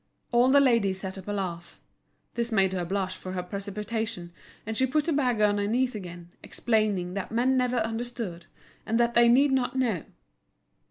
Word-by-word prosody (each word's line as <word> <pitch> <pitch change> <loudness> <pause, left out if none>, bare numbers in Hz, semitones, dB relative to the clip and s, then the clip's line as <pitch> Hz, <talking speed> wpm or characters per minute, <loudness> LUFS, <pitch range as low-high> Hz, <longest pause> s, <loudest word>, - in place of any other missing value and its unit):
All 240 +1 +4
the 280 +2 +6
ladies 230 -8 +3
set 190 0 -5
up 190 - -12
a - - -2
laugh. 175 -4 -5 0.5
This 235 0 -2
made 190 -3 +2
her 180 -2 -1
blush 185 +1 -2
for 185 0 -7
her 180 -1 -3
precipitation, 205 0 -4 0.3
and 220 +1 -4
she 260 +3 +2
put 300 +3 +1
the 330 - +1
bag 250 -6 +1
on 205 -1 +3
her 200 - 0
knees 250 +3 +1
again, 175 -4 -8
explaining 210 -6 0
that 200 +1 -4
men 250 +3 +2
never 250 -1 +1
understood, 225 -6 -4 0.4
and 225 +1 0
that 235 0 +2
they 235 0 +6
need 270 +4 +5
not 260 -1 0
know. 230 -10 0
220 Hz, 185 wpm, -27 LUFS, 190-245 Hz, 0.5 s, the